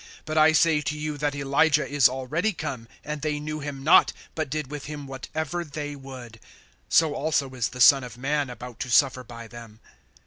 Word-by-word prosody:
(12)But 155 - -4
I 155 +1 +6
say 160 -1 +3
to 150 +1 -3
you, 150 0 -3
that 145 -1 -1
Elijah 145 +2 +2
is 145 -3 +4
already 150 +11 -1
come, 140 -8 -5 0.2
and 150 0 -5
they 150 -1 -1
knew 155 +1 -5
him 140 -2 -6
not, 155 - +6 0.2
but 155 -3 -3
did 150 -1 -4
with 145 -2 -6
him 150 -1 -7
whatever 155 +5 -4
they 145 -1 -6
would. 130 -4 -11 0.5
So 160 -2 +4
also 145 -3 -1
is 125 -3 -1
the 125 0 -6
Son 135 0 +7
of 120 -1 -9
man 140 +2 -1
about 125 0 -9
to 130 - -4
suffer 130 +1 +3
by 115 -1 -10
them. 115 -2 -12
145 Hz, 200 wpm, -25 LUFS, 130-150 Hz, 0.5 s, Son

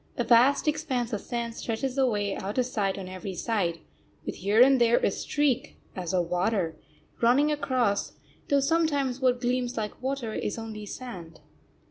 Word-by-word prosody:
A 240 - +1
vast 250 +6 +4
expanse 265 -6 -1
of 205 - -2
sand 235 -1 -4
stretches 245 +3 -3
away 210 -7 +1
out 200 +4 -5
of 255 - +3
sight 200 -6 -1
on 190 -2 -6
every 185 +1 -6
side, 180 -6 -1 0.4
with - - -4
here 205 +4 +1
and 260 0 +6
there 235 0 +5
a - - +2
streak, 290 -1 -1 0.2
as 180 -3 -3
of 180 -2 +1
water, 180 -2 0 0.5
running 265 +6 +4
across, 255 -8 0 0.4
though 280 -1 +4
sometimes 285 -4 +1
what 250 -2 +2
gleams 245 0 -1
like 210 0 -4
water 260 -4 -2
is 210 - -3
only 220 -2 -7
sand. 180 -10 -8
235 Hz, 165 wpm, -27 LUFS, 205-260 Hz, 0.5 s, and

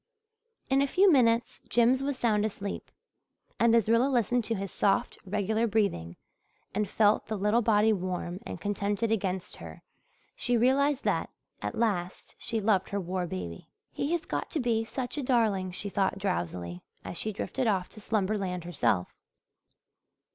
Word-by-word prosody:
In 270 +1 +3
a 280 - +2
few 380 +6 +5
minutes 235 -4 +3
Jims 240 +2 +4
was 275 -1 -2
sound 215 -4 +2
asleep; 200 -2 -4 0.7
and, 235 0 +5
as 230 -3 +3
Rilla 230 +4 +4
listened 245 -1 +2
to 225 - -1
his 195 -1 -4
soft, 205 +5 +1
regular 210 +3 0
breathing 195 - 0 0.6
and 210 -1 -1
felt 210 -1 +3
the 215 0 -2
little 210 +4 +2
body 220 -1 +4
warm 180 -1 -3
and - - -7
contented 205 +2 -1
against 190 -4 -1
her, 80 -1 -10 0.5
she 245 0 +1
realized 270 +4 +3
that - - 0 0.3
at - - -3
last 195 -6 -1
she 230 -2 -2
loved 200 -3 +2
her 200 - -1
war 180 -1 -2
baby. 85 - -6 0.2
"He 285 - -2
has 345 - -1
got - - -3
to 320 - 0
be 235 -3 +1
such 250 +5 -4
a - - -2
darling," 220 -7 +2
she 185 +3 -4
thought 195 -1 0
drowsily, 90 - -3 0.2
as 175 - -2
she 215 - 0
drifted 245 +5 -2
off 190 -4 +1
to 215 - -13
slumberland 195 -4 -1
herself. 140 - 0
210 Hz, 160 wpm, -29 LUFS, 190-235 Hz, 0.7 s, few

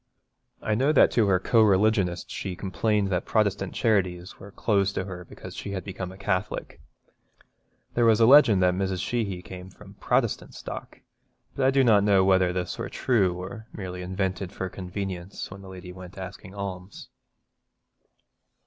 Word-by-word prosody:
I 110 - 0
know 135 +7 +2
that - - +6
to 110 -4 +3
her 95 -2 +4
co 115 +4 +3
religionists 100 -3 +2
she 95 - -4
complained 100 +2 0
that 90 -2 0
Protestant 100 -3 0
charities 95 -5 0
were 100 - -10
closed 100 -1 0
to - - -1
her 90 -2 -7
because - - -11
she 100 - -5
had 95 - -4
become 95 -2 -6
a 95 - -12
Catholic. 95 0 -3 1.1
There 120 - +2
was 110 -1 +5
a 115 - +6
legend 115 -7 +7
that 90 0 +4
Mrs. 95 0 -1
Sheehy 100 -7 -2
came 90 -1 -9
from 90 - -15
a - - -21
Protestant - - 0
stock, - - -8 0.5
but 130 - +2
I - - +6
do 135 0 +4
not 105 -5 +5
know 100 -2 +4
whether 95 -2 +4
this 90 -1 -3
were - - -3
true 100 -8 +1
or 100 +5 -8
merely 90 -2 -6
invented 95 0 -3
for 95 -2 -4
convenience 95 0 -6
when 100 0 -9
the 95 - -11
lady 90 -1 -9
went 90 0 -11
asking 95 +1 -8
alms. 95 -1 -7
95 Hz, 175 wpm, -26 LUFS, 90-105 Hz, 1.1 s, legend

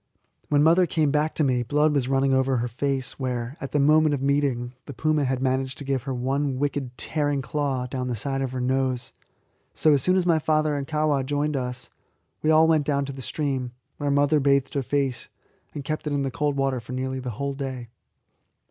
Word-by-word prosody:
When 145 -1 +4
mother 170 +3 +5
came 155 -4 +1
back 150 +1 0
to 155 - +2
me 125 -3 +2
blood 150 +5 +2
was 135 -4 +1
running 135 0 +2
over 130 0 +2
her 120 +1 -1
face, 135 +3 -2
where, 125 -1 -3
at 135 - -5
the - - +1
moment 150 +1 +4
of 135 - -5
meeting, 135 -4 0
the 140 - -8
puma 155 +2 +1
had 130 0 -1
managed 130 0 0
to - - -7
give 135 -2 -1
her - - -1
one 135 +2 -1
wicked, 135 -3 -2
tearing 145 -3 -1
claw 135 -3 -1
down 125 0 -4
the 125 - -1
side 135 +5 -2
of 130 -2 -2
her 130 - -4
nose. 130 -1 -1 0.6
So, 155 - +4
as 140 - +3
soon 185 +6 +2
as 185 -2 +2
my 165 -2 +3
father 155 -1 +1
and 140 -1 -3
Kahwa 150 -3 +1
joined 145 +2 -1
us, 125 -1 -4 0.5
we 155 - +1
all 160 +1 +6
went 155 -3 +2
down 140 -1 +1
to 140 - -6
the 135 - -8
stream, 130 -3 -2 0.2
where 145 -1 -2
mother 145 +2 +3
bathed 140 -1 +2
her 140 - 0
face, 135 -1 -1 0.5
and 145 - -4
kept 155 +2 -3
it 145 - -1
in 140 -1 0
the 135 - -2
cold 145 +3 -1
water 135 -2 0
for 120 +2 -9
nearly 130 +1 -2
the 130 -1 -5
whole 140 0 -2
day. 130 -3 -5
140 Hz, 220 wpm, -25 LUFS, 130-145 Hz, 0.6 s, all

